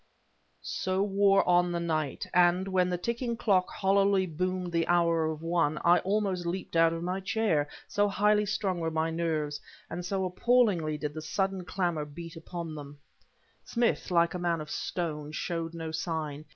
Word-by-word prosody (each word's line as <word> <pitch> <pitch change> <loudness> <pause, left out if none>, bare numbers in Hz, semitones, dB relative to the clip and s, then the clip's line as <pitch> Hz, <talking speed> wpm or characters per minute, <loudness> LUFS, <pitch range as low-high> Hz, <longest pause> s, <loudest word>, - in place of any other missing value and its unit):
So 185 +1 -1
wore 195 0 +3
on 175 0 +4
the 170 - -1
night; 155 -4 -2
and, 180 +1 +4
when 185 -1 +2
the 180 - -1
ticking 235 +5 -2
clock 190 -5 +2
hollowly 195 0 +2
boomed 180 +2 -2
the 165 -1 0
hour 170 -2 +3
of 160 0 -5
one, 165 -3 +1
I 175 +1 +6
almost 195 -2 0
leaped 180 0 -4
out 165 0 +5
of 165 0 -4
my 180 +2 -2
chair, 190 -7 0 0.2
so 205 0 +2
highly 210 +1 +2
strung 195 -3 -1
were 165 -1 -1
my 160 0 -1
nerves, 155 -3 -2 0.3
and 175 +1 -4
so 190 +1 -1
appallingly 185 -6 +2
did 150 -1 -4
the 155 - -6
sudden 195 +1 -2
clangor 175 -5 -1
beat 165 +3 -9
upon 165 0 -6
them. 145 -1 -9 0.7
Smith, 235 -3 0
like 170 -2 +3
a 180 - -3
man 170 -1 0
of 150 0 -7
stone, 155 -4 -3
showed 165 0 -3
no 165 -1 -5
sign. 160 -3 -3
175 Hz, 175 wpm, -29 LUFS, 160-190 Hz, 0.7 s, I